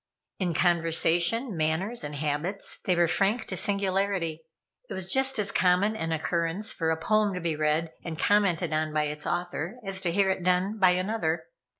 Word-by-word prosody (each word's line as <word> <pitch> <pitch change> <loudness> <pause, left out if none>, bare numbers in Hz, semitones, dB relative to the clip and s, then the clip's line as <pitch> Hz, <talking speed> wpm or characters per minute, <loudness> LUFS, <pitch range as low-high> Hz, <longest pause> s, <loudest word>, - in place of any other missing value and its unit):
In 175 -4 -1
conversation, 175 +6 +2
manners 165 +9 -1
and 150 0 -5
habits, 150 +7 -3
they 180 - +2
were 175 0 +3
frank 205 +7 +1
to 185 - -4
singularity. 190 -4 0 0.5
It - - -5
was 190 0 -2
just 265 -1 +2
as 200 -2 0
common 185 +4 +2
an 165 -6 -3
occurrence 170 +5 -1
for 165 -2 -1
a 160 - +1
poem 210 +3 +1
to - - -3
be 165 -2 -1
read 155 +2 0
and 165 -2 -5
commented 195 -5 +2
on 155 0 0
by 155 0 +2
its 150 0 -5
author, 175 +2 -3
as 195 -1 0
to 175 -3 0
hear 195 +1 +2
it 190 - -2
done 185 +4 +1
by 185 -2 +6
another. 185 -3 -1
180 Hz, 185 wpm, -27 LUFS, 160-200 Hz, 0.5 s, by